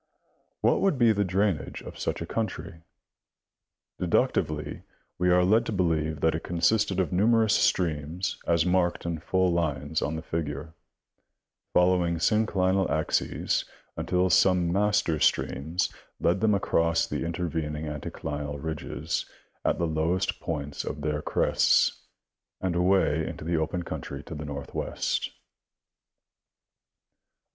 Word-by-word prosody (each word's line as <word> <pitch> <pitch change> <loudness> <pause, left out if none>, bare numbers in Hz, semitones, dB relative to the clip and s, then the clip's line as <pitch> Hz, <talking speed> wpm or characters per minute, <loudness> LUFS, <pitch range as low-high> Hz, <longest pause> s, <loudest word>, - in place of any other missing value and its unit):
What - - +3
would 195 -8 +2
be 120 -2 +5
the 105 -1 +1
drainage 95 -3 -1
of - - -10
such - - -2
a - - -5
country? 105 -6 -4 1.2
Deductively 75 -1 0 0.4
we 90 0 +2
are 90 0 +5
led 110 +5 +4
to - - -2
believe 80 -6 0
that 80 - +3
it 80 - -2
consisted 95 +3 +1
of 95 - 0
numerous 110 +3 +4
streams 85 +1 0
as 85 -1 +3
marked 90 -1 +1
in 85 -2 -2
full 95 +2 +1
lines 80 -2 -1
on 75 - -1
the 80 - -5
figure, 80 -1 -4 1.0
following 90 -1 +3
synclinal 95 +1 +2
axes 80 0 0 0.3
until 90 0 +1
some 90 -1 +4
master 100 -5 +2
streams 80 +5 0 0.3
led 90 +3 +1
them 105 -2 +4
across 85 -4 +2
the - - -3
intervening 80 -2 -3
anticlinal 75 -1 -5
ridges 80 +1 -3 0.4
at - - +1
the 85 - 0
lowest 80 +3 0
points 75 -3 -4
of 75 - -5
their 75 0 -1
crests - - +2 0.5
and 95 -2 -1
away 90 -4 +2
into - - -7
the 85 +1 0
open 85 +3 -1
country 70 -3 -6
to 85 - -8
the 75 0 -6
northwest. 70 -2 -3
85 Hz, 130 wpm, -27 LUFS, 80-95 Hz, 1.2 s, be